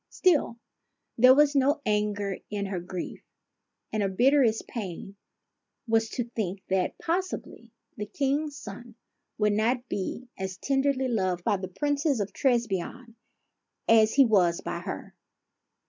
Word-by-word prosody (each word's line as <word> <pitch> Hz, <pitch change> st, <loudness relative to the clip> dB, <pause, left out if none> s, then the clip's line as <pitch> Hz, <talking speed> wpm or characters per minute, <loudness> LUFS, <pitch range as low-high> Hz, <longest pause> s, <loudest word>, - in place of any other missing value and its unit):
Still, 315 Hz, -10 st, +2 dB, 0.6 s
there 255 Hz, +2 st, +7 dB
was 295 Hz, 0 st, +5 dB
no 280 Hz, +3 st, +3 dB
anger 210 Hz, -2 st, 0 dB
in 205 Hz, -1 st, -2 dB
her 195 Hz, -2 st, -3 dB
grief, 180 Hz, 0 st, -6 dB, 0.7 s
and 215 Hz, -, 0 dB
her 200 Hz, -, +1 dB
bitterest 240 Hz, +2 st, +3 dB
pain 195 Hz, -3 st, -6 dB, 0.7 s
was 225 Hz, 0 st, +2 dB
to 245 Hz, -, -2 dB
think 200 Hz, -5 st, -4 dB
that 190 Hz, -1 st, 0 dB
possibly 365 Hz, +3 st, -3 dB, 0.3 s
the 210 Hz, -1 st, -4 dB
King's 285 Hz, +4 st, -1 dB
son 235 Hz, -1 st, -10 dB, 0.4 s
would 210 Hz, -1 st, +2 dB
not 240 Hz, +4 st, +1 dB
be 205 Hz, +6 st, -4 dB
as 190 Hz, -1 st, -4 dB
tenderly 270 Hz, 0 st, +1 dB
loved 185 Hz, -7 st, -1 dB
by 200 Hz, -, +2 dB
the 185 Hz, 0 st, -5 dB
Princess 290 Hz, -, 0 dB
of 205 Hz, -1 st, -3 dB
Trebizonde 235 Hz, -1 st, -1 dB, 0.7 s
as 220 Hz, -1 st, +5 dB
he 275 Hz, -1 st, +7 dB
was 180 Hz, -7 st, +3 dB
by -, -, -4 dB
her. -, -, -7 dB
225 Hz, 135 wpm, -27 LUFS, 195-270 Hz, 0.7 s, there